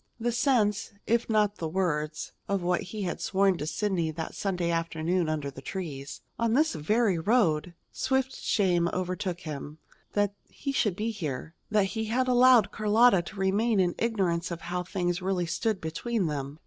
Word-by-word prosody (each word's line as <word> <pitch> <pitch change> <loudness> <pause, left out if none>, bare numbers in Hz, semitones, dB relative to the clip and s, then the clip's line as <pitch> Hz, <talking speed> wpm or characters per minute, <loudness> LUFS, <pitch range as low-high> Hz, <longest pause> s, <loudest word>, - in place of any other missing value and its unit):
The 240 +1 0
sense, 225 -6 +1
if 235 +1 +1
not 210 -2 +2
the 165 - -3
words, 155 -4 -1 0.2
of 200 -2 0
what 175 0 +1
he 205 +2 -5
had 175 - -3
sworn 195 -2 +2
to 150 - -3
Sidney 170 0 0
that 160 +1 -5
Sunday 180 -4 -1
afternoon 165 +1 0
under 150 -3 -2
the 135 - -10
trees, 145 -6 -6 0.2
on 230 -1 +2
this 305 +5 +3
very 195 +4 +1
road! 170 -5 +2 0.2
Swift 265 0 0
shame 175 -5 +1
overtook 185 0 -3
him, 150 -1 -6 0.4
that 205 -1 +1 0.2
he 280 - -4
should 215 -8 +1
be 220 +4 -1
here, 160 - -5 0.2
that 210 -1 +3
he 220 -1 -2
had 250 +4 0
allowed 250 -3 +6
Carlotta 215 -1 +4
to 175 +5 -10
remain 205 +3 +2
in 175 -2 +2
ignorance 185 -7 0
of 170 -1 -5
how 180 +1 -3
things 175 -1 -2
really 185 -1 0
stood 215 +4 -1
between 195 +6 -2
them. 145 -2 -3
190 Hz, 175 wpm, -28 LUFS, 170-220 Hz, 0.4 s, allowed